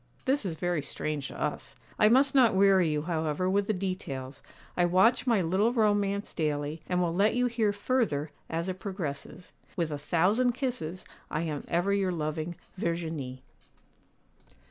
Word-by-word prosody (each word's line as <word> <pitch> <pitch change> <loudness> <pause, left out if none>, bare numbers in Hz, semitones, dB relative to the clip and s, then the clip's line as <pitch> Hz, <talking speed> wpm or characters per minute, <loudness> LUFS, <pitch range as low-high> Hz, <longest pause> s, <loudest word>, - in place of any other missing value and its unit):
This 265 -5 +1
is 165 - -3
very 175 -1 -1
strange 145 0 -3
to - - -9
us. - - -3 0.2
I 215 - +6
must 270 +4 +4
not 250 -7 +5
weary 190 -3 +5
you, 150 -1 -1
however, 160 +1 -1
with 200 +1 +1
the - - +2
details. 180 -9 -4 0.3
I 175 - +2
watch 190 +9 +3
my 225 -6 +3
little 190 +7 +2
romance 205 -3 +1
daily, 150 0 -2
and 180 -1 +1
will 170 -1 0
let 200 +6 +3
you 250 0 +2
hear 230 -3 +1
further 205 - 0 0.2
as 165 +2 -2
it 185 0 -4
progresses. 180 -3 -6 0.2
'With 165 -3 -1
a 145 - -3
thousand 195 +11 +2
kisses, 235 - -4 0.2
I 155 - -1
am 155 -4 -3
ever 175 +4 +1
your 195 -2 +1
loving 160 +1 -3 0.2
'VERGINIE. 160 -7 -3
180 Hz, 165 wpm, -29 LUFS, 155-205 Hz, 0.3 s, I